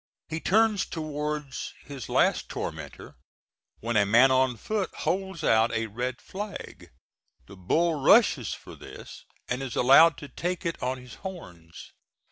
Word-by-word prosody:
He 160 +1 -3
turns 215 +2 +3
towards 150 -3 -4
his 135 -5 -8
last - - +2
tormentor - - -7 0.6
when 120 +1 -2
a 105 - +5
man 120 +6 +5
on 130 -2 +2
foot 205 - -2
holds 190 0 -2
out 110 -2 +3
a 115 0 0
red 125 +4 -4
flag; 205 +2 -8 0.6
the 95 - -13
bull 160 - +1
rushes 145 - +4
for - - -9
this - - -12 0.2
and 125 +1 -2
is 130 -3 -5
allowed 145 +6 +6
to 145 - -9
take 180 +5 -4
it 165 - -3
on 130 +1 -1
his 125 -2 -12
horns. 90 - -10
140 Hz, 145 wpm, -27 LUFS, 120-170 Hz, 0.6 s, allowed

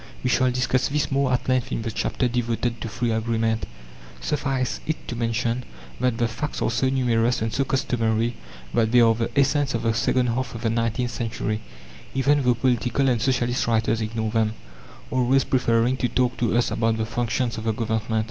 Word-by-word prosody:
We 125 - +1
shall 130 0 +3
discuss 125 0 +1
this 145 +1 -1
more 135 -1 +2
at 125 - 0
length 130 -2 +1
in 110 - -2
the 115 - -3
chapter 125 +3 -1
devoted 120 0 -1
to 115 - -4
Free 120 +1 -1
Agreement. 110 0 0 0.5
Suffice 135 -3 -1
it 155 - -3
to 120 - -4
mention 115 +1 -1 0.4
that 125 -2 +1
the 120 - +2
facts 125 +6 -4
are - - 0
so 120 +3 +1
numerous 125 -2 +2
and 110 0 -2
so 135 - +1
customary 115 -3 0 0.4
that 110 -1 +2
they 125 - +6
are 115 -1 +6
the 115 +1 -2
essence 140 -1 +2
of 115 - -2
the 115 -1 +2
second 125 +2 +1
half 120 0 -2
of 115 - -7
the 115 - +1
nineteenth 115 +2 0
century, 110 -2 -3 0.5
even 140 +2 +3
though 125 -2 +3
political 125 +2 +1
and 120 -3 +1
socialist 125 0 +1
writers 115 0 +1
ignore 110 0 -2
them, 110 -1 +1 0.6
always 130 +1 +3
preferring 120 0 +2
to 125 - 0
talk 125 +1 +1
to 120 -1 +1
us 120 - +1
about 115 0 +1
the 110 - -1
functions 120 0 -1
of 110 - -7
the 110 - +2
Government. 110 0 -1
120 Hz, 195 wpm, -24 LUFS, 115-130 Hz, 0.6 s, they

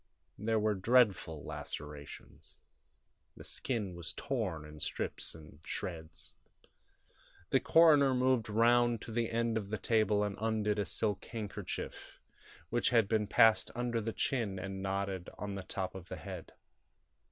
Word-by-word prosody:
There 110 +2 +1
were 105 0 +2
dreadful 95 -7 +3
lacerations; 75 -1 -8 0.8
the - - -10
skin 105 -7 -2
was 85 -1 -2
torn 100 - -3
in 75 0 -11
strips - - -3
and 75 -2 -13
shreds. 80 -2 -5 1.2
The 135 - +5
coroner 145 -5 +6
moved 125 -3 +2
round 120 +2 +4
to - - -8
the 115 0 0
end 115 0 0
of 100 -2 -8
the 110 - -2
table 105 -1 +2
and 100 -1 -2
undid 110 -2 +1
a 100 - +1
silk 105 -1 -1
handkerchief, 110 -4 -6 0.5
which 120 +1 +2
had 115 -4 +4
been 105 -1 +1
passed 110 0 +5
under 120 -1 -1
the 115 +1 -2
chin 110 -6 -1
and 95 +1 -5
knotted 95 -1 -2
on 105 -1 -4
the 100 - -4
top 95 0 -4
of 95 -1 -10
the - - -4
head. - - -8
105 Hz, 145 wpm, -33 LUFS, 95-115 Hz, 1.2 s, coroner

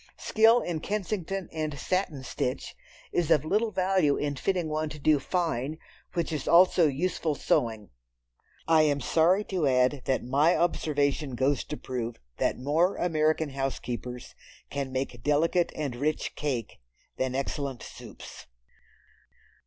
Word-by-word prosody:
Skill 225 +2 +4
in 170 -3 -3
Kensington 195 -1 -3
and 155 -2 -3
satin 160 -2 -1
stitch 130 +1 -3 0.4
is 175 -3 0
of 150 - +4
little 215 +7 +1
value 185 -7 +2
in 145 -1 -2
fitting 180 +3 -1
one 155 0 -2
to 150 - -8
do 150 0 +3
"fine," 155 -3 -1 0.4
which 170 -1 -1
is 150 -3 -3
also 175 -1 +6
useful 155 +2 -1
sewing. 110 -6 0 0.8
I 160 -1 +5
am 145 -2 +2
sorry 170 +8 +3
to 180 -7 -1
add 130 +1 +2
that 135 - 0
my 145 +7 +3
observation 145 -5 0
goes 130 +3 +1
to 150 - -5
prove 120 -2 -4 0.2
that - - 0
more 155 +8 +2
American 155 -2 +1
housekeepers 125 -2 -4 0.4
can 140 -2 -3
make 130 -3 -3
delicate 160 +6 +2
and 145 -5 -3
rich 150 +5 -1
cake 130 -7 -3 0.4
than 130 0 -1
excellent 135 -2 -3
soups. - - -11
150 Hz, 135 wpm, -28 LUFS, 135-170 Hz, 0.8 s, also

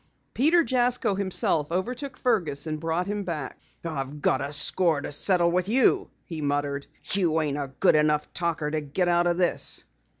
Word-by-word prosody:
Peter 325 +6 +3
Jasko 245 -5 +1
himself 185 -5 +1
overtook 245 +10 -3
Fergus 170 - 0
and 155 -1 -4
brought 165 +2 -1
him 205 +1 -3
back. 155 -7 -5 0.3
"I've 145 -2 -5
got 135 -1 +1
a 140 - -4
score 165 +1 +3
to 145 - -6
settle 170 +3 +3
with 180 +2 0
you," 250 +2 +3 0.2
he 160 -3 -6
muttered. 145 -1 -2 0.3
"You 170 -5 +1
ain't 145 -2 -2
a 140 -2 -5
good - - +4
enough 150 0 +1
talker 165 -4 -2
to 155 0 -1
get 150 +5 -2
out 175 0 +2
of 175 0 +1
this." 180 -1 0
170 Hz, 175 wpm, -25 LUFS, 150-190 Hz, 0.3 s, good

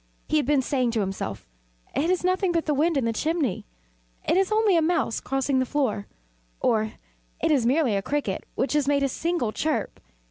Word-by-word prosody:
He 310 - +2
had 290 - +1
been 285 -2 +3
saying 255 -2 +1
to 225 - +1
himself 110 - -4 0.5
"It 325 - +1
is 365 -1 +1
nothing 370 0 +2
but 335 -1 0
the 300 - +1
wind 310 +2 +2
in 265 - +1
the 230 - 0
chimney 295 - -1 0.6
it - - +3
is 385 +2 +2
only 430 -3 +4
a 330 - +4
mouse 320 -7 +1
crossing 270 0 0
the - - +3
floor," 245 -9 -1 0.5
or 220 0 +1 0.5
"It 325 - +1
is 260 -6 +3
merely 265 -4 +2
a 195 - 0
cricket 275 -4 -2
which 265 - 0
has 295 -2 +1
made 280 -1 +2
a - - +3
single 320 -4 -1
chirp." 310 +7 -2
285 Hz, 205 wpm, -25 LUFS, 235-330 Hz, 0.6 s, only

